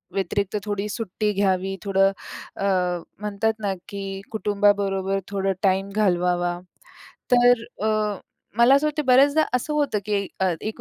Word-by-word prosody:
व्यतिरिक्त 200 +2 -1
थोडी 205 -1 -2
सुट्टी 210 -1 -2
घ्यावी. 195 -1 0
थोडं 195 -1 +3 0.4
अ, 195 - -3 0.5
म्हणतात 210 +1 -1
ना, 200 -2 -1 0.2
की 195 -1 -5
कुटुंबाबरोबर 200 -2 +1
थोडं 195 -1 -1
टाईम 195 0 +2
घालवावा. 175 -3 +1 0.7
तर 245 -1 +5 0.2
अ, - - +2 0.7
मला 240 +3 +6
असं 280 +2 +2
वाटतं 300 -1 -2
बऱ्याचदा 280 +4 +5
असं 250 +4 -1
होतं, 290 -8 0
की 210 - -2
एक 195 0 -2
200 Hz, 130 wpm, -23 LUFS, 195-220 Hz, 0.7 s, मला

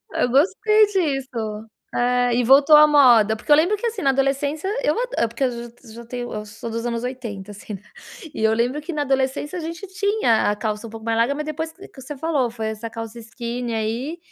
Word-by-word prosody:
eu - - +1
gostei 415 - +4
disso, 265 - -2 0.3
eh, 245 0 +2
e 245 +1 +2
voltou 275 +5 +7
à 300 0 +8
moda, 240 -7 +5
porque 220 - -10
eu 295 - +9
lembro 355 +7 +3
que, 445 +3 -3
assim, 440 -4 -3
na 275 - +3
adolescência 280 +5 0
eu - - +2 0.2
a 230 - +2
porque 235 +4 -2
eu 255 - +2
j 235 0 -7
eu 230 - -13
já 235 +1 -10
tenho 245 0 -5
eu 210 0 -5
sou 210 +2 -8
dos 230 +1 -4
anos 235 -1 -2
80, 230 -6 -6
assim, 205 +1 -8
né. 195 - -9 0.5
E - - -4
eu 220 - +4
lembro 245 +6 0
que 340 +3 -6
na 295 - -1
adolescência 270 +4 -1
a - - -3
gente 335 +4 -6
tinha 380 - +1
a 210 - -1
calça 215 +1 -3
um - - -10
pouco 225 0 -10
mais 225 0 +1
larga, 235 +5 +2
mas 300 +1 -4
depois 315 +1 -4
que 390 +3 -14
que 265 - -14
você 270 +3 -8
falou 285 -5 0
foi 225 -1 -5
essa 220 +1 -5
calça 225 0 -7
skinny 235 +1 -5
aí, 235 +10 -3
250 Hz, 235 wpm, -22 LUFS, 230-300 Hz, 0.5 s, eu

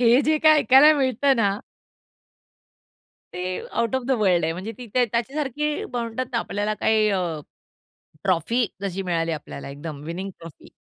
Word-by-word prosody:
हे 245 +2 +5
जे 310 +1 +2
काही 310 -1 +6
ऐकायला 270 +6 +7
मिळतं 265 +1 +2
ना 200 -2 +1 1.8
ते 180 - -5 0.3
आउट 235 +2 -1
ऑफ 260 - 0
द - - -2
वर्ल्ड 180 -5 +3
आहे. 160 - 0
म्हणजे 190 +6 -6
ती 245 - -8
त्याच्यासारखी 265 +5 -1
म्हणतात 240 +1 -3
ना 230 - +1
आपल्याला 210 0 -2
काही 215 0 +2
अ, 190 -2 +1 1.0
ट्रॉफी 195 +7 +1 0.2
जशी 195 -1 -3
मिळाली 165 -2 -1
आपल्याला 150 -3 -7
एकदम 145 +1 -7
विनिंग 185 +4 -5
ट्रॉफी. 165 -2 -13
225 Hz, 150 wpm, -23 LUFS, 180-260 Hz, 1.8 s, ऐकायला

